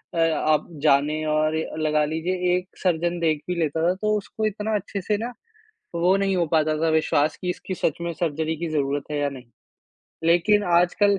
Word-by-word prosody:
अ, - - -3
आप 155 -2 +2 0.2
जाने 150 +1 +3
और 155 +1 +1 0.3
लगा 150 -1 +2
लीजिए 160 +4 -2 0.2
एक 180 +1 -3 0.2
सर्जन 175 -1 +1
देख 155 -3 +1
भी 180 - -1
लेता 160 0 0
था - - +2
तो 215 +2 0
उसको 215 +2 -4
इतना 215 +1 -1
अच्छे 200 0 -3
से 210 +3 0
ना 240 +3 -4 0.6
वो 180 +3 +3
नहीं 195 -1 +1
हो 175 -2 +2
पाता 155 -1 +3
था 165 - +3
विश्वास 155 -1 +2
कि 180 - -2
इसकी 185 +1 -4
सच 160 - -1
में 170 0 -2
सर्जरी 160 -1 -1
की 170 +1 -3
ज़रूरत 140 -2 -1
है 150 - -1
या 145 0 +1
नहीं। 130 -3 -10 0.8
लेकिन 190 +5 +4
आजकल 195 +3 +3
165 Hz, 195 wpm, -24 LUFS, 155-185 Hz, 0.8 s, लेकिन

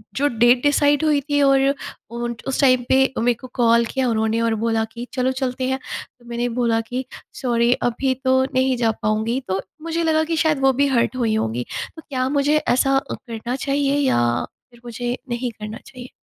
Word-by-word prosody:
जो 285 +2 +2
date 240 +1 +5
decide 290 +1 +3
हुई 300 -2 +3
थी 290 +1 0
और 275 0 +4 0.4
उन 235 0 -3
उस 270 - -1
टाइम 255 -2 +4
पे 265 - +5 0.2
मेरे 240 +1 +3
को 255 - -8
कॉल 235 -1 +4
किया 260 +2 -1
उन्होंने 220 0 0
और 230 -1 +1
बोला 225 -1 +1
कि 240 +1 -7
चलो 260 0 +1
चलते 260 -1 -2
हैं, 265 0 -1 0.4
तो 240 - -21
मैंने 240 +1 -1
बोला 230 -2 +2
कि 255 +1 -3 0.4
सॉरी 235 -1 +2 0.2
अभी 260 +3 0
तो 260 0 +4
नहीं 260 0 +2
जा 230 -2 +2
पाऊँगी, 220 +4 0
तो 190 0 0 0.2
मुझे 330 0 -1
लगा 315 -1 +2
कि 325 +1 -2
शायद 310 -3 +2
वो 270 0 +4
भी 280 +2 +2
हर्ट 245 -2 +1
हुई 225 -3 +1
होंगी। 120 - -1 0.3
तो 320 - -10
क्या 255 -2 -1
मुझे 290 +2 +2
ऐसा 270 -1 +2
अ, - - -3
करना 235 +1 -5
चाहिए 280 +1 0
या 120 - +1 0.3
फिर 240 - -19
मुझे 240 +1 -3
नहीं 240 +1 -2
करना 215 +1 -6
चाहिए? 250 -1 -11
250 Hz, 200 wpm, -21 LUFS, 235-275 Hz, 0.4 s, date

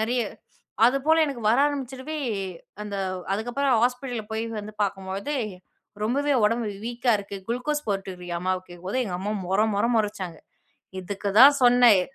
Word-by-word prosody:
நெறைய. 240 +2 +1 0.6
அதுபோல 295 +5 +3
எனக்கு 270 -6 -5
வர 235 - +3
ஆரம்பிச்சுறவே, 275 +2 -5 0.7
அந்த 200 -1 -5 0.4
அதுக்கப்புறம் 245 +5 0
ஹாஸ்பிட்டல்ல 250 -3 -2
போய், 220 +1 -1 0.2
வந்து 210 +1 -9
பார்க்கும்பொழுது 195 +8 -3 0.7
ரொம்பவே 280 +5 +1
உடம்பு 225 +1 +1 0.2
வீக்கா 240 0 +1
இருக்கு. 200 0 -7
குளுக்கோஸ் 295 +5 -2
போட்டுறியாம்மா 185 -3 -3
அம்மாவுக்கு 185 0 -2
கேக்கும்போது 185 +9 -2
எங்க 180 -4 -3
அம்மா 205 +2 -2 0.2
மொற 195 +2 +2 0.2
மொற 205 - +2
மொறச்சாங்க. 195 -6 -2 0.6
"இதுக்கு 200 +2 -4
தான் 285 +1 +9
சொன்னேன் 245 -5 +6
230 Hz, 135 wpm, -25 LUFS, 200-260 Hz, 0.7 s, தான்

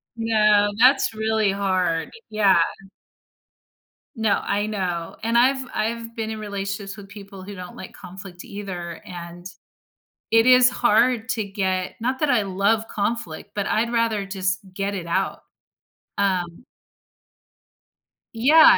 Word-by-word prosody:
No, 215 -2 +3
that's 255 -1 +5
really 220 -1 +1
hard, 185 -4 0 0.2
yeah. 205 -4 +4 1.6
No, 220 -3 +2
I 205 +1 0
know. 180 -6 -3
And 230 +1 +2
I've 260 +2 +4
I've 230 +1 -3
been 220 -1 -3
in 220 - -5
relationships 200 0 -4
with 200 -1 -10
people 200 -2 -11
who 200 +1 -8
don't 180 -1 -9
like 190 - -9
conflict 180 0 -10
either, 180 -4 -6
and 175 0 -9 0.9
it 225 +1 +5
is 250 0 +7
hard 240 0 +2
to 220 -4 0
get 190 -2 -2
not 255 +3 -1
that 300 - +2
I 240 -3 +3
love 200 +3 +1
conflict, 205 -6 -3
but 205 -1 -1
I'd 230 +2 +1
rather 225 -4 +1
just 190 -1 -1 0.2
get 200 +1 -2
it 180 -4 -5
out, 170 - -1 0.8
um 185 0 -1 1.7
Yeah. 295 +8 +7
205 Hz, 130 wpm, -23 LUFS, 190-225 Hz, 1.7 s, is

